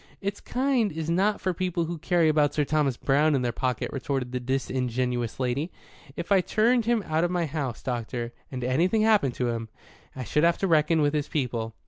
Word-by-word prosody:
"Its 200 0 -4
kind 255 -4 +1
is 160 +1 -3
not 200 +4 +2
for 185 - -1
people 175 -1 -1
who 170 0 -5
carry 170 0 +2
about 150 -2 +2
Sir 150 - +2
Thomas 145 -4 +1
Browne 145 +2 +2
in 130 - 0
their 120 - 0
pocket," 125 0 -2
retorted 135 -2 -2
the 125 - -2
disingenuous 125 -2 -2
lady. 135 +6 -1 0.4
"If 170 +3 -6
I 195 -2 +6
turned 230 +5 +2
him 235 -2 +1
out 155 +1 0
of 175 - +1
my 175 -1 0
house, 140 -6 -4
doctor, 120 -1 -3 0.2
and 125 -2 -4
anything 175 - +2
happened 210 - +3
to 125 -1 -1
him, 115 -1 -3 0.5
I 130 - -4
should 150 +7 0
have 170 0 +4
to 195 - 0
reckon 160 -1 +3
with 145 0 +2
his 150 -2 -1
people. 115 -6 -2
150 Hz, 205 wpm, -26 LUFS, 125-175 Hz, 0.5 s, I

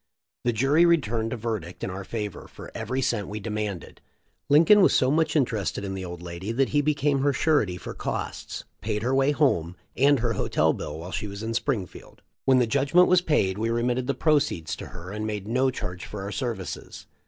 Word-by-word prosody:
The 120 - +3
jury 135 +8 +3
returned 120 -10 +2
a 125 - -3
verdict 105 -6 -4
in - - -2
our 95 +1 -6
favor 105 0 -5
for - - -11
every 130 +1 -2
cent 115 -6 0
we 105 +1 -5
demanded. 105 -3 -5 0.5
Lincoln 165 +8 +7
was - - +5
so 130 +1 +3
much 155 0 +1
interest 120 -8 0
ed - - -4
in 95 -1 -4
the 95 -1 -5
old 90 -1 -7
lady 90 +4 -5
that 135 +2 +2
he 145 - +2
became 145 -1 +1
her 140 +1 +2
surety 130 - +2
for - - -7
costs, - - -5 0.2
paid 105 +1 -2
her 125 +2 +1
way 135 +1 +3
home, 90 - +1 0.2
and 140 +2 +4
her 115 0 0
hotel - - +1
bill 75 +1 -6
while 85 +3 -7
she 105 - -3
was 100 +1 -7
in 115 +1 -2
Springfield. 115 -6 -4 0.2
When 130 -1 +5
the 125 - +4
judgment 140 +9 +3
was 180 -1 +5
paid 105 - +1
we 115 +1 0
remitted 120 +2 0
the 140 - 0
proceeds 140 - +1
to - - -7
her 85 +2 -9
and 105 +1 -3
made 105 -2 -4
no 130 +4 +2
charge 90 -7 -5
for 105 -2 -6
our 100 - -5
services. 115 -7 -5
115 Hz, 210 wpm, -26 LUFS, 100-140 Hz, 0.5 s, Lincoln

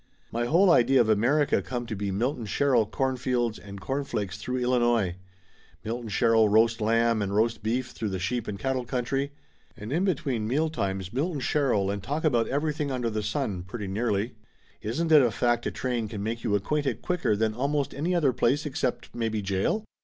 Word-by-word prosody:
My 120 +1 -1
whole 175 +8 +5
idea 135 -2 +5
of 115 -2 +3
America 130 +8 +3
come 120 -1 -4
to 115 - -4
be 100 0 -3
Milton 115 +4 -1
Sherrill 125 -2 +2
cornfields 125 -3 -1
and 100 -1 -9
corn 135 +7 -2
flakes 105 -7 -4
through 125 +4 -3
Illinois; 120 -7 +2 0.7
Milton 115 +1 -4
Sherrill 115 0 +4
roast 115 +2 +3
lamb 115 0 +2
and 100 0 -2
roast 110 0 +1
beef 120 +3 -1
through 110 - -3
the 95 - -2
sheep 115 +6 -2
and 100 - -4
cattle 130 +2 -1
country. 135 +3 -2 0.5
And 105 +6 -6
in 175 +4 +1
between 135 - -1
mealtimes, 105 - -1
Milton 150 +4 -1
Sherrill 125 -9 +1
and 100 0 -4
talk 145 +10 -3
about 120 -8 +2
everything 150 +1 -1
under 125 -3 -1
the 110 0 -2
sun 100 -2 -2
pretty 100 +3 -6
nearly. 105 +2 -1 0.5
Isn't 160 +10 -2
it 150 -2 +8
a 125 - +3
fact 120 +2 0
a - - -2
train 120 -3 -2
can 100 -1 -5
make 115 +2 -3
you 105 -3 +1
acquainted 135 +4 -1
quicker 180 - +1
than 110 +1 0
almost 140 +4 -1
any 165 +6 -1
other 145 -7 +3
place 140 +4 +1
except 130 -3 -3
maybe 110 -3 -2
jail? 100 - 0
120 Hz, 190 wpm, -27 LUFS, 105-135 Hz, 0.7 s, it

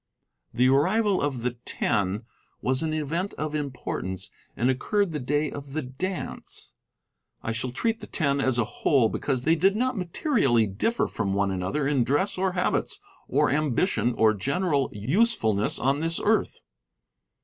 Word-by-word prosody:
The 125 +1 +3
arrival 190 +10 +3
of 135 -5 -2
the 125 0 -2
Ten 100 +2 -1 0.4
was 130 +1 +1
an 160 -1 -1
event 155 +5 -2
of 155 0 -3
importance, 130 -10 -4 0.3
and 120 - +1
occurred 200 +9 0
the 150 - -3
day 145 +3 0
of 140 -1 -8
the 155 0 -2
dance. 175 +9 -5 0.7
I 110 - -2
shall 120 +3 -2
treat 225 - -1
the - - -9
Ten 140 -4 0
as 130 -2 +2
a 120 - +3
whole 125 -2 +2
because 130 0 -1
they 160 - +4
did 190 +4 +3
not 255 +3 0
materially 170 - +2
differ 105 - 0
from 100 -3 -2
one 100 -1 +1
another 95 +11 -1
in 140 -4 +2
dress 145 - +1
or 185 0 0
habits 180 - 0 0.3
or - - +2
ambition 145 - +1
or 110 -1 +4
general 140 - 0
usefulness 110 - +1
on 135 +3 +1
this 165 +1 0
earth. 220 +1 +1
140 Hz, 160 wpm, -26 LUFS, 120-180 Hz, 0.7 s, they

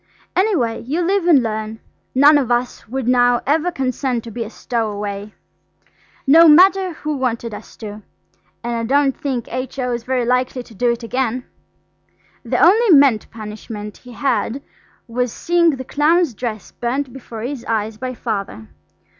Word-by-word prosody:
Any 405 +2 +2
way, 230 -6 -1
you 295 +8 -2
live 375 0 +1
and 290 -7 +6
learn. 220 0 -4 0.4
None 290 +3 +7
of 260 -4 -2
us 240 0 -1
would 260 0 -3
now 245 -1 +4
ever 315 +5 +1
consent 255 -4 -2
to 230 - -9
be 230 +2 -4
a 215 - -8
stowaway, 210 -3 -4 0.9
no 325 +5 +7
matter 370 +3 +6
who 305 -1 -4
wanted 235 -4 -2
us 210 +1 -11
to, 215 -1 -8 0.6
and 240 0 -2
I 230 - -2
don't 280 -2 +3
think 260 -5 -3
H.O.'s 255 -2 -3
very 255 0 -1
likely 250 +1 0
to 235 - -16
do 240 +4 +1
it 235 0 -4
again. 250 +1 -2 1.0
The - - -1
only 440 +6 +5
meant 275 - +5
punishment 210 -1 -8
he 250 -1 -13
had 260 +1 -1 0.4
was 245 0 -1
seeing 340 +4 +2
the 260 0 -7
clown's 310 +1 +2
dress 220 -1 -5
burnt 255 +2 -3
before 230 -4 -8
his 255 -1 -4
eyes 220 -1 -2
by 255 +1 -5
Father. 200 - -4
250 Hz, 160 wpm, -19 LUFS, 225-285 Hz, 1.0 s, None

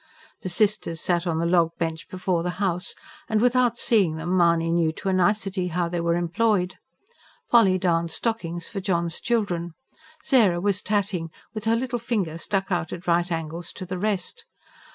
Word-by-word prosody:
The 185 - -4
sisters 200 -4 +1
sat 175 +1 0
on 165 -2 0
the 165 - 0
log 170 -1 +2
bench 160 -1 -3
before 185 -2 -1
the 180 - -2
house; 185 -2 -1 0.3
and, 220 - +2
without 245 0 +3
seeing 195 -11 +3
them, 165 +3 -2
Mahony 170 -2 +3
knew 165 -2 +2
to 195 - -4
a - - +1
nicety 190 0 +1
how 175 0 -1
they 175 0 -2
were 170 0 +1
employed. 180 +2 0 0.7
Polly 200 -6 +6
darned 170 -2 +1
stockings, 170 -2 -2
for 195 - -5
John's 170 -3 0
children; 175 -8 -1 0.5
Sarah 210 -10 +4
was 200 +1 0
tatting, 200 -5 -1 0.2
with 215 -1 -5
her 225 +1 +3
little 240 0 -2
finger 200 -9 -2
stuck 195 +2 -2
out 175 -3 -1
at 175 0 -7
right 175 +1 +2
angles 165 +1 -4
to 185 - -7
the 185 0 -5
rest. 215 - -2
180 Hz, 175 wpm, -25 LUFS, 170-205 Hz, 0.7 s, Polly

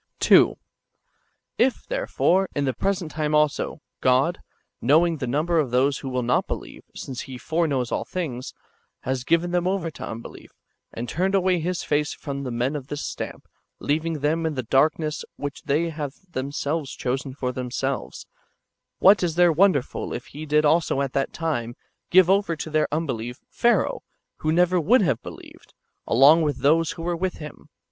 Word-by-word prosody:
^ - - -45
2. - - +5 1.0
If, 255 +1 +2
therefore, 195 - +1
in 145 - 0
the 130 - 0
present 185 - -2
time 150 0 -1
also, 150 0 +1 0.2
God, 130 +7 +2 0.4
knowing 160 +6 +3
the 130 - -4
number 160 +6 +1
of 145 -5 0
those 130 +3 +2
who 135 - -5
will 125 -1 -1
not 125 +1 +1
believe, - - -6
since 130 -2 -6
He 130 - -6
foreknows 145 -4 -1
all - - -1
things, 135 -9 -5 0.5
has 130 -1 -2
given 170 +4 +1
them 180 0 +1
over 185 -4 -1
to - - -10
unbelief, 115 +1 -9 0.4
and 120 +2 -5
turned 185 - 0
away 185 -2 +2
His 175 +2 -2
face 150 0 0
from 140 -2 -6 0.2
men 130 +5 0
of 140 -3 -5
this 145 0 -4
stamp, - - -6 0.3
leaving 155 +1 -1
them 160 +3 +1
in 155 - -3
the 130 - -2
darkness 150 +5 +1
which 145 -1 -6
they 165 +4 +1
have 150 -3 -5 0.2
themselves 140 +1 -3
chosen 130 +1 -3
for 125 -2 -2
themselves, 130 +2 -4 0.7
what 195 +2 +6
is 170 -3 0
there 175 -1 +5
wonderful 165 -5 +1
if 120 - -5
He 155 +2 -9
did 150 +1 +3
also 150 -2 +2
at 135 -2 -2
that 135 -1 0
time 120 -8 -3 0.3
give 185 -1 +6
over 195 -3 +2
to 160 0 -6
their 155 0 +2
unbelief, 125 -6 -3
Pharaoh, 240 0 +2 0.4
who 155 - -1
never 180 +2 +3
would 215 +8 +4
have 130 -8 +1
believed, - - -12 0.3
along 140 +7 +6
with 150 -4 0
those 160 +3 +3
who 165 - -8
were 175 0 -1
with 185 +2 -2
him 150 -1 -11
150 Hz, 175 wpm, -24 LUFS, 135-170 Hz, 1.0 s, what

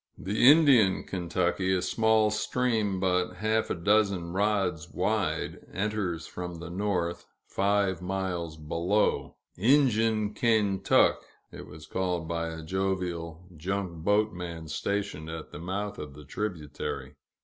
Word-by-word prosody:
The 105 +6 +4
Indian 140 - +6
Kentucky, 90 +1 -1
a 90 - 0
small 110 -1 +3
stream 110 -3 0
but 90 -1 +1
half 110 +3 0
a - - 0
dozen 95 -1 +1
rods 95 -5 0
wide, - - -1
enters 95 -5 -2
from 90 -1 -6
the 85 +1 -8
north, 90 -3 -2 0.2
five 100 -2 +1
miles 90 -4 -3
below 85 +7 0 0.2
"Injun 110 -3 +3
Kaintuck," 105 -4 +3 0.3
it - - -9
was 75 +1 -11
called 90 -1 -2
by 85 0 -2
a 80 0 -6
jovial 90 -2 -3
junk 90 0 -3
boat 105 +3 +2
man 85 -2 -6
stationed 95 0 -3
at 80 -1 -7
the - - -8
mouth 100 +4 -4
of 75 -2 -7
the 75 0 -12
tributary. 80 -4 -4
95 Hz, 125 wpm, -28 LUFS, 85-105 Hz, 0.3 s, Indian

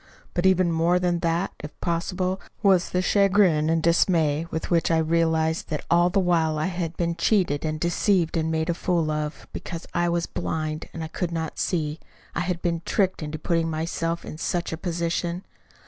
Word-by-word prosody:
But 175 +1 +2
even 185 -2 +3
more 165 +2 +3
than 175 -1 +1
that, 170 +2 0
if 150 - -9
possible, 180 +2 -1 0.2
was 190 -3 +4
the 180 0 0
chagrin 190 -6 +3
and 165 0 +1
dismay 165 -2 +2
with 160 - -4
which 170 -1 +3
I 165 - +3
realized 160 0 +1
that 155 -3 -3
all 175 +1 +5
the 195 +2 +1
while 165 -4 +2
I 155 - 0
had 175 -3 -3
been 170 -1 0
cheated 170 -5 +1
and 155 -1 -2
deceived 175 +1 +1
and 160 -1 0
made 160 +1 0
a - - 0
fool 170 -2 0
of, 150 0 -3
because 170 -1 -6
I 175 0 +1
was 170 0 0
blind, 155 -1 -3
and 160 -1 -6
could 180 -2 -2
not 160 -1 -4
see. 155 -3 -1 0.3
I - - -2
had 175 -1 -2
been 170 -1 0
tricked 190 -1 0
into 155 0 -4
putting 165 0 0
myself 165 +1 -2
in 155 - -8
such 175 +1 -1
a - - 0
position." 170 +1 -2
170 Hz, 190 wpm, -25 LUFS, 160-180 Hz, 0.3 s, all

